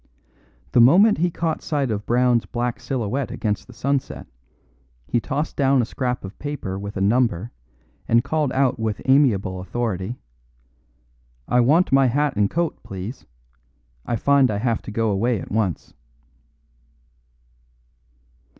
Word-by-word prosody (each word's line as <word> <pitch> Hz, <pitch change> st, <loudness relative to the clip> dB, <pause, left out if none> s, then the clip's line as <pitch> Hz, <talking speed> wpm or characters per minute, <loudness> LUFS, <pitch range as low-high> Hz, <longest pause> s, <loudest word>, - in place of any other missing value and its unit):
The -, -, +5 dB
moment 190 Hz, -, +6 dB
he 175 Hz, +2 st, +2 dB
caught 165 Hz, -1 st, -2 dB
sight 140 Hz, -5 st, -1 dB
of 105 Hz, 0 st, -4 dB
Brown's 120 Hz, -1 st, +2 dB
black 120 Hz, -1 st, -3 dB
silhouette 130 Hz, +1 st, -2 dB
against 105 Hz, -3 st, -3 dB
the 125 Hz, -, -13 dB
sunset, 135 Hz, +3 st, -2 dB, 0.8 s
he 120 Hz, -, 0 dB
tossed 150 Hz, +6 st, -3 dB
down 135 Hz, -1 st, +3 dB
a 120 Hz, -, +2 dB
scrap 125 Hz, -1 st, -3 dB
of 95 Hz, -, -10 dB
paper 140 Hz, -10 st, -4 dB
with 100 Hz, +1 st, -6 dB
a -, -, -2 dB
number 115 Hz, -1 st, +1 dB, 0.6 s
and 115 Hz, +1 st, +3 dB
called 155 Hz, -4 st, -1 dB
out 135 Hz, -2 st, +1 dB
with 110 Hz, -2 st, -2 dB
amiable 120 Hz, -9 st, +3 dB
authority: 105 Hz, +2 st, -3 dB, 1.3 s
"I 125 Hz, -, +2 dB
want 150 Hz, +9 st, +3 dB
my 135 Hz, -1 st, +5 dB
hat 145 Hz, +2 st, 0 dB
and 100 Hz, -1 st, +2 dB
coat, 170 Hz, 0 st, -2 dB
please; 100 Hz, +6 st, -8 dB, 0.8 s
I 120 Hz, -, -2 dB
find 140 Hz, +3 st, +3 dB
I 105 Hz, -, -1 dB
have 115 Hz, +1 st, -1 dB
to -, -, -8 dB
go 115 Hz, 0 st, 0 dB
away 110 Hz, +4 st, 0 dB
at -, -, -9 dB
once." 100 Hz, -5 st, -2 dB
120 Hz, 140 wpm, -22 LUFS, 105-140 Hz, 1.3 s, moment